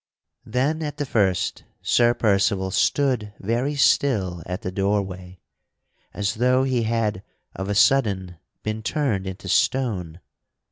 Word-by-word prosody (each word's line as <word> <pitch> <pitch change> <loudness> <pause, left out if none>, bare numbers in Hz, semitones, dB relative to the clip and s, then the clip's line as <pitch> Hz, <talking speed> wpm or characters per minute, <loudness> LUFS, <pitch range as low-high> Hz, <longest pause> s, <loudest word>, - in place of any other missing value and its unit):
Then 135 +8 0
at 150 -2 -4
the 145 - -2
first 95 -8 0 0.2
Sir 120 0 +3
Percival 100 -2 +1
stood 125 -2 +1
very 120 +8 -1
still 100 -11 +2
at 90 +4 -5
the 95 - -3
door 100 +2 +1
way 90 -1 -10 0.7
as 100 -1 -1
though 125 +3 +2
he 130 -3 +1
had 110 -4 -1 0.3
of 95 +2 -4
a 100 - 0
sudden 100 -8 +2 0.3
been 110 +1 -3
turned 110 -7 -1
into 95 0 -7
stone. 95 -7 0
105 Hz, 135 wpm, -23 LUFS, 95-125 Hz, 0.7 s, Sir